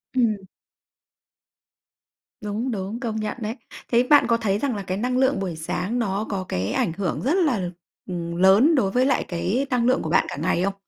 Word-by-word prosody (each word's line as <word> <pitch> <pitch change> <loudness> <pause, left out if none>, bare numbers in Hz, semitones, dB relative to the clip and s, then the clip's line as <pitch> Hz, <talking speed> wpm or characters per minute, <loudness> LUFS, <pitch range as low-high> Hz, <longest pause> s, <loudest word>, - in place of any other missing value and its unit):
Ừm. 230 -5 +2 2.0
Đúng, 215 +5 -3
đúng, 205 +2 -4
công 230 -4 -3
nhận 215 +2 -3
đấy. 220 +1 -3 0.4
Thế 240 0 +4
bạn 290 +3 +5
có 230 -1 +3
thấy 205 -4 0
rằng 265 -1 -1
là 200 - -4
cái 185 0 -3
năng 250 +4 -1
lượng 265 -4 +2
buổi 185 -4 -3
sáng 180 +8 -3
nó 205 -1 -1
có 190 -3 -3
cái 95 +2 -1
ảnh 215 -11 0
hưởng 185 -1 -2
rất 275 +6 +1
là, 205 - 0 0.4
ừm, 170 -1 -4
lớn 195 - +5
đối 200 -9 +2
với 250 +4 +2
lại 275 - +1
cái 190 +10 -1
năng 245 -2 +1
lượng 255 +1 +3
của 160 - -4
bạn 170 - +3
cả - - -5
ngày 170 +3 0
không? 195 +1 0
210 Hz, 205 wpm, -23 LUFS, 185-245 Hz, 2.0 s, bạn